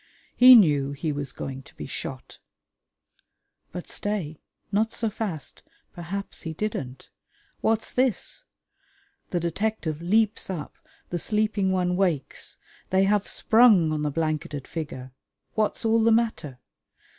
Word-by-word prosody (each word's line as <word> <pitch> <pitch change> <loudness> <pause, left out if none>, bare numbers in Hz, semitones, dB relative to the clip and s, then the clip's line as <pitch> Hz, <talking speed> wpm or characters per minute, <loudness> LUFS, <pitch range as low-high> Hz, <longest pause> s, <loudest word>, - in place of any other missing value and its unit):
He 255 +1 +10
knew 145 - +4
he 150 +2 -2
was 145 -1 -4
going 135 0 -6
to - - -17
be 75 - -7
shot.... - - -6 1.3
But 180 0 -7
stay! 185 -8 -3 0.3
Not 220 +2 +1
so 225 -2 -2
fast! 185 - -5 0.3
Perhaps 190 +4 -6
he 160 - -5
didn't. 140 -11 -4 0.5
What's 225 0 0
this? 255 - 0 0.9
The 175 - 0
detective 170 -2 -2
leaps 215 +5 +1
up, 170 -6 -5 0.4
the 175 - -1
sleeping 210 -1 0
one 180 -1 +1
wakes: 175 -7 -1 0.3
they 190 +1 +3
have 205 +1 +2
sprung 220 -8 +5
on 155 -1 -1
the 150 - 0
blanketed 155 -2 -2
figure. 130 -6 -6 0.4
What's 215 +1 -1
all 225 0 +3
the 230 - +5
matter? 195 - 0
180 Hz, 130 wpm, -26 LUFS, 150-215 Hz, 1.3 s, He